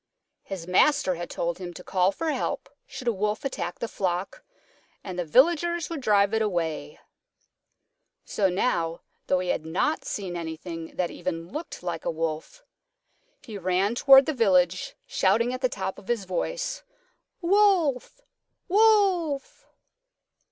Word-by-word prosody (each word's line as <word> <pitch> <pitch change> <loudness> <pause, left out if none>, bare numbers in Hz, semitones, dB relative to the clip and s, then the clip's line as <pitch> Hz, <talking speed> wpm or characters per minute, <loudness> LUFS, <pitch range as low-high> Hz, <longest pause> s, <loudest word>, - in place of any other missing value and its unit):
His 185 -4 -7
Master 185 +1 +3
had 175 0 -6
told 170 +1 -3
him 175 -2 -7
to 180 - -9
call 185 +1 +2
for 320 +9 -2
help - - -3 0.2
should 255 - -8
a 235 - +3
Wolf 210 +4 -2
attack 260 -9 -3
the 235 - -3
flock, 190 - -3 0.6
and 185 -2 -6
the - - +1
Villagers 335 - +3
would 320 -4 -4
drive 205 -3 +3
it 220 - +2
away. 175 - -2 1.3
So 195 -2 +1
now, 170 -4 0 0.3
though 185 - +3
he 180 0 -2
had 155 - 0
not 180 - 0
seen 190 -4 -4
anything 165 0 -6
that 180 -2 -1
even 165 -1 -5
looked 305 - -7
like 175 -1 -4
a - - -1
Wolf, 165 - -4 0.8
he 215 -4 -8
ran 185 +3 +1
toward 270 +2 +7
the 310 - -1
village 185 -7 +2
shouting 230 +6 +2
at 255 - -5
the 255 - +2
top 190 -3 -4
of 195 - -17
his 230 -5 -1
voice, - - -3 0.6
"Wolf! 375 - +2 0.5
Wolf!" 380 -8 +2
200 Hz, 145 wpm, -26 LUFS, 180-295 Hz, 1.3 s, toward